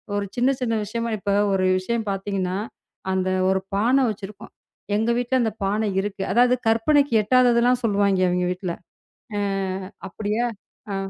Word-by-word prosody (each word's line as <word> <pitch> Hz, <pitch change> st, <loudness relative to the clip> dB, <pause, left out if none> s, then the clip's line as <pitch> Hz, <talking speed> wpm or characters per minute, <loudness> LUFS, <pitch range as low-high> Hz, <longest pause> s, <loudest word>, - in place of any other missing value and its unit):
ஒரு 205 Hz, 0 st, -1 dB
சின்ன, 255 Hz, +3 st, +3 dB
சின்ன 230 Hz, -2 st, 0 dB
விஷயமா 230 Hz, +3 st, -3 dB
இப்ப 200 Hz, 0 st, -3 dB, 0.2 s
ஒரு 190 Hz, -1 st, +1 dB
விஷயம் 225 Hz, +3 st, -3 dB
பாத்தீங்கன்னா, 195 Hz, -2 st, -2 dB, 0.6 s
"அந்த 185 Hz, 0 st, 0 dB, 0.2 s
ஒரு 190 Hz, 0 st, +1 dB
பானை 245 Hz, +7 st, +3 dB
வச்சிருக்கும்" 205 Hz, -1 st, -8 dB, 0.5 s
"எங்க 225 Hz, +2 st, 0 dB
வீட்டுல 245 Hz, +1 st, 0 dB
அந்தப் 220 Hz, -2 st, -3 dB
பானை 210 Hz, +2 st, 0 dB
இருக்கு" 195 Hz, -1 st, -4 dB
அதாவது 245 Hz, +2 st, +4 dB
கற்பனைக்கு 280 Hz, +4 st, +3 dB
எட்டாததெல்லாம் 245 Hz, +1 st, +3 dB
சொல்லுவாய்ங்க, 200 Hz, -3 st, +2 dB
அவிங்க 180 Hz, 0 st, 0 dB
வீட்டுல. 180 Hz, -2 st, -5 dB, 0.6 s
அ -, -, 0 dB, 0.7 s
அப்படியா? 215 Hz, +5 st, -2 dB, 0.5 s
அ. -, -, -1 dB
215 Hz, 140 wpm, -23 LUFS, 195-240 Hz, 0.7 s, அதாவது